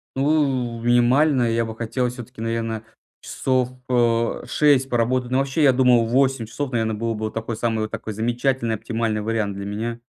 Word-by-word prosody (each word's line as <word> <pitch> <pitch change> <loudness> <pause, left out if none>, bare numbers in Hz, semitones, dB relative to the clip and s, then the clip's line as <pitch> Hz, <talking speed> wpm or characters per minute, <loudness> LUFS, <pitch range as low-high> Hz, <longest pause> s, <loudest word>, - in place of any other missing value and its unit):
Ну, 135 -5 0
минимально 125 +3 +3
я 115 0 +1
бы 110 - -6
хотел 120 +2 -1
всё-таки, 125 -1 -10
наверное, 115 -1 -2 0.4
часов, 130 -2 0 0.2
э, 115 -2 +1
6 140 -3 +3
поработать. 125 +1 0
Ну 130 - +2
вообще, 135 +3 0
я 135 - +7
думал, 125 -2 +4
8 130 0 +1
часов, 135 +4 -4
наверное, 110 -2 0
было 115 +2 -2
бы 110 0 -3
такой, 115 +1 -4
самый 110 0 -1
вот 110 - -3
такой 110 - -5
замечательный 120 +2 0
оптимальный 110 0 -2
вариант 110 -2 -1
для 100 0 -6
меня. 115 +3 -4
120 Hz, 170 wpm, -22 LUFS, 115-130 Hz, 0.4 s, я